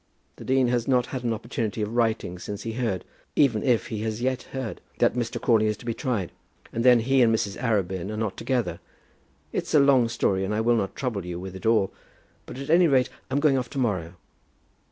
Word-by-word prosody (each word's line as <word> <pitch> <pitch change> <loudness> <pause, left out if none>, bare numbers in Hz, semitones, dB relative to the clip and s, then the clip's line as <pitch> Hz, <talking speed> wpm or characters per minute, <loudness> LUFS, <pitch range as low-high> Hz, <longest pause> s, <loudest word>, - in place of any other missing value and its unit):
The - - -9
dean 130 -1 +2
has 120 -1 0
not 125 -2 +3
had 130 -2 -5
an 120 - 0
opportunity 115 -1 -3
of 105 +2 -4
writing 110 -6 0
since 100 +2 -6
he 115 - -4
heard, 110 -7 -2 0.3
even 125 -7 +3
if 125 -4 +1
he 110 - -3
has 110 0 -2
yet 130 +1 0
heard, 130 -4 -5 0.2
that - - +3
Mr. 120 -2 -2
Crawley 110 -2 +3
is 105 -1 -1
to 120 - -14
be 115 - -1
tried. 115 - -2 0.4
And 115 - -1
then 125 -2 +6
he 135 +3 +3
and 115 -2 +5
Mrs. 105 -3 0
Arabin 95 -6 0
are 105 - -4
not 110 -3 -2
together. 115 -10 -1 0.7
It's - - -1
a - - +8
long 135 -4 +5
story, 95 -4 0
and 100 +2 -1
I - - 0
will 120 +1 +3
not 100 -4 -1
trouble 120 -8 -2
you 90 0 -5
with 95 0 -7
it 100 +4 -4
all; 110 -4 +3 0.5
but - - -8
at 140 +3 -4
any 175 +1 +6
rate 130 -4 +3 0.2
I'm 135 +2 +1
going 145 -3 +3
off 125 -1 -5
to - - -8
morrow. 95 -9 -1
115 Hz, 225 wpm, -25 LUFS, 105-130 Hz, 0.7 s, a